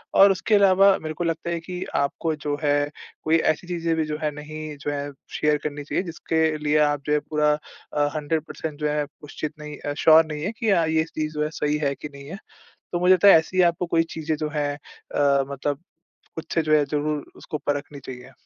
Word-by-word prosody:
और 195 0 +8
उसके 195 +3 +1
अलावा 195 -1 +6
मेरे 155 0 -4
को 175 - -3
लगता 165 0 -2
है 170 - -1
कि 180 +2 -6
आपको 150 +3 0
जो 145 -1 -3
है 145 -1 +3 0.5
कोई 160 +1 +4
ऐसी 175 +3 -7
चीज़ें 170 -2 -1
भी 160 - 0
जो 150 0 -3
है 150 - +1
नहीं 155 0 -7
जो 145 - -2
है 145 0 -3 0.2
शेयर 150 0 +2
करनी 145 -1 -4
चाहिए 155 - -1
जिसके 165 -1 -2 0.2
लिए 150 0 +1
आप 145 -1 +1
जो 150 - +1
है 150 - +3
पूरा 150 0 +1 0.4
अ, 145 0 +2
100% 155 0 -3
जो 150 0 0
है 150 0 0 0.2
उशचित 150 +1 -5
नहीं 150 -1 -8
अ - - -2
श्योर 160 0 +8
नहीं 150 -1 -5
है 205 - -1
कि 225 - 0
हाँ 170 -4 +3
ये 160 0 +2
चीज़ 155 0 -2
जो 150 0 -1
है 150 - -1
सही 150 0 0
है 140 - +1
कि 150 - -8
नहीं 140 0 -11
है। 190 - -6 0.6
तो 175 - -1
मुझे 180 +1 +5
लगता 200 +2 +5
है 195 - +9
ऐसी 185 +3 -1
आपको 175 +1 -4
कोई 165 -1 +2
चीज़ें 160 -1 -1
जो 150 0 -2
हैं 145 -1 0
अ, 140 -2 0
मतलब 140 +2 -3 0.5
खुद 160 - -6
से 165 - +3
जो 155 -1 +1
है 150 - +3
ज़रूर 150 +1 -2
उसको 155 - -5
परखनी 145 0 -2
चाहिए। 125 +1 -9
155 Hz, 230 wpm, -24 LUFS, 145-165 Hz, 0.6 s, है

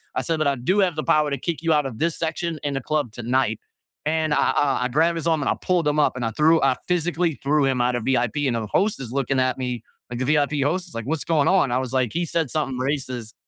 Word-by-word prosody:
I - - 0
said, 165 -1 -1
"But 155 - +1
I 140 - +2
do 175 +11 0
have 185 -4 +2
the 155 - -1
power 150 -1 +3
to 140 - -1
kick 165 +3 -3
you 165 - +2
out 150 -2 +2
of 115 -4 -8
this 165 0 0
section 165 0 -2
in 145 -1 -1
the 135 - -2
club 150 -3 -1
tonight." 120 -1 0 0.5
And 155 0 +1
I - - +2
I 140 -3 +1
I - - +2
grab 160 +6 +2
his 165 0 -3
arm, 160 -2 +2
and - - 0
I - - +1
pulled 175 -4 +1
him 150 +1 +1
up, 150 - +2
and 125 -2 -3
I 115 - -1
threw 160 +7 +4
I 135 -2 +3
physically 175 -2 0
threw 145 +1 +2
him 130 -2 +1
out 125 0 +1
of 120 - -2
VIP. 130 +2 +1
And 120 - 0
the 115 -1 -2
host 200 - +1
is 120 -3 -7
looking 135 0 0
at 130 -1 +1
me, 125 -3 -4 0.3
like, 120 0 -5
the 130 - -1
VIP 145 0 +1
host 175 +6 -1
is, 170 - -14
like, 115 -1 -4
"What's 155 +2 -2
going 155 -4 +2
on?" 185 -9 +3
I 125 - +2
was 130 -1 -4
like, 130 -4 +1
"He 175 +1 0
said 165 -3 -1
something 135 -5 -2
racist, 130 -4 -3
145 Hz, 285 wpm, -23 LUFS, 130-160 Hz, 0.5 s, threw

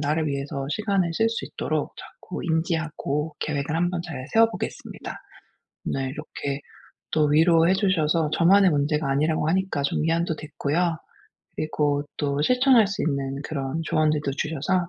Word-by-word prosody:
나를 155 +2 0
위해서 140 0 -3
시간을 195 -2 0
쓸 225 +6 +3
수 230 - -3
있도록 - - -3
자꾸 - - -9
인지하고 160 -3 -1
계획을 145 0 -2
한번 175 0 0
잘 135 -6 -6
세워보겠습니다. 225 0 0 0.8
네 135 0 -1
이렇게 140 -1 -5 0.5
또 155 -1 +3
위로해 165 +3 +5
주셔서 165 -5 +2
저만의 190 +2 +5
문제가 150 0 +1
아니라고 155 +3 +1
하니까 185 -4 0
좀 140 - 0
위안도 165 0 +1
됐고요 160 +3 -1 0.6
그리고 145 -2 0
또 145 -1 0
실천할 250 - +5
수 200 - -3
있는 140 -3 -1
그런 140 +1 -3
조언들도 150 -2 +1
주셔서 160 +5 -1
155 Hz, 330 characters per minute, -25 LUFS, 145-175 Hz, 0.8 s, 위로해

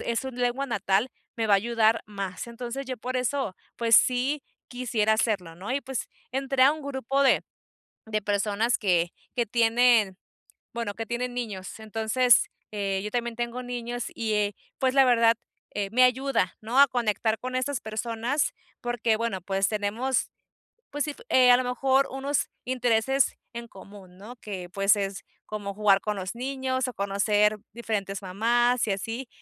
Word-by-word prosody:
es 235 -1 0
su 265 0 -5
lengua 245 +2 -1
natal, 205 0 +1 0.3
me 225 -2 -1
va 200 - +6
a - - +7
ayudar 230 0 +2
más, 195 -1 -5
entonces 245 +3 -6
yo 255 -1 -4
por 255 +3 -3
eso 255 -5 -1 0.2
pues 230 -1 +5
sí 260 +3 +2 0.3
quisiera 230 -4 0
hacerlo, 195 -7 -1
¿no? 195 +7 -5
Y 280 - 0
pues 265 -3 -4 0.2
entré 270 0 +1
a 275 - +7
un 310 -1 -7
grupo 270 0 -1
de 270 - +4 0.6
de 215 -1 -2
personas 205 +3 +1
que 175 -4 +2 0.3
que 240 -1 +1
tienen, 230 -3 +3 0.6
bueno, 230 -4 -3
que 225 -1 -5
tienen 245 +1 -3
niños. 215 -4 -5
Entonces, 225 +3 +3 0.2
eh, 195 -2 -1
yo 210 - -4
también 235 -1 -2
tengo 240 +1 -3
niños, 245 -1 -4
y, 220 -2 -1
eh, 205 -1 +1 0.2
pues 260 0 +1
la 270 - +7
verdad, 230 -2 +5 0.4
eh, 200 -1 -1
me 255 +2 +4
ayuda, 255 -6 +1
¿no? 230 +4 -1
A 280 - +8
conectar 225 -2 0
con 255 0 -5
estas 255 0 -1
personas 230 +5 -1 0.3
porque 240 -2 0
bueno, 225 -4 -2
pues 195 +1 0
tenemos 220 +5 -1 0.6
pues 290 -1 -1
sí, 305 - -3
f - - -16
eh, 250 -1 +6
a - - +8
lo 255 - -1
mejor 265 +2 +2
unos 270 +2 -1 0.2
intereses 250 +1 +1 0.2
en 235 0 -7
común, 195 -2 -14
¿no? 215 +6 -11
Que, 185 -6 -7
pues 195 +2 +4
es 195 -2 -3 0.2
como 205 -2 -5
jugar 200 -1 +4
con 210 -1 -2
los 185 +2 -4
niños, 260 0 -2
o 245 - -6
conocer 205 +1 +2 0.2
diferentes 205 -4 -3
mamás 235 +6 +2
y 205 - +1
así, 225 +6 -4
230 Hz, 170 wpm, -27 LUFS, 205-255 Hz, 0.6 s, A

